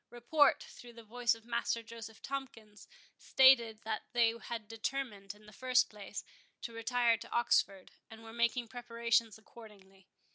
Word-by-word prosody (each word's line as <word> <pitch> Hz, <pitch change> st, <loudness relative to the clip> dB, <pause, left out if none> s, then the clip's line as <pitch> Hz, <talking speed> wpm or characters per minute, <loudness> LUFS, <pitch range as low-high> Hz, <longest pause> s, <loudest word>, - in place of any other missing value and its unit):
Report, 270 Hz, +5 st, +2 dB
through 240 Hz, -1 st, -13 dB
the 230 Hz, 0 st, -13 dB
voice 240 Hz, +2 st, 0 dB
of 225 Hz, 0 st, -17 dB
Master 235 Hz, -1 st, -1 dB
Joseph 225 Hz, -1 st, -11 dB
Tomkins, 235 Hz, -6 st, -7 dB, 0.3 s
stated, 235 Hz, -5 st, +4 dB
that 220 Hz, -1 st, -3 dB
they 235 Hz, -2 st, +3 dB
had 230 Hz, -1 st, -7 dB
determined, 220 Hz, -3 st, -4 dB
in 210 Hz, 0 st, -20 dB
the 210 Hz, -, -15 dB
first 255 Hz, +2 st, +2 dB
place, 210 Hz, -1 st, -8 dB, 0.4 s
to 235 Hz, -, -6 dB
retire 230 Hz, 0 st, +1 dB
to -, -, -11 dB
Oxford, 195 Hz, -5 st, +1 dB, 0.2 s
and 225 Hz, 0 st, -12 dB
were 225 Hz, 0 st, -11 dB
making 235 Hz, +1 st, 0 dB
preparations 235 Hz, -2 st, -1 dB
accordingly. 200 Hz, -4 st, -17 dB
230 Hz, 150 wpm, -33 LUFS, 215-240 Hz, 0.4 s, stated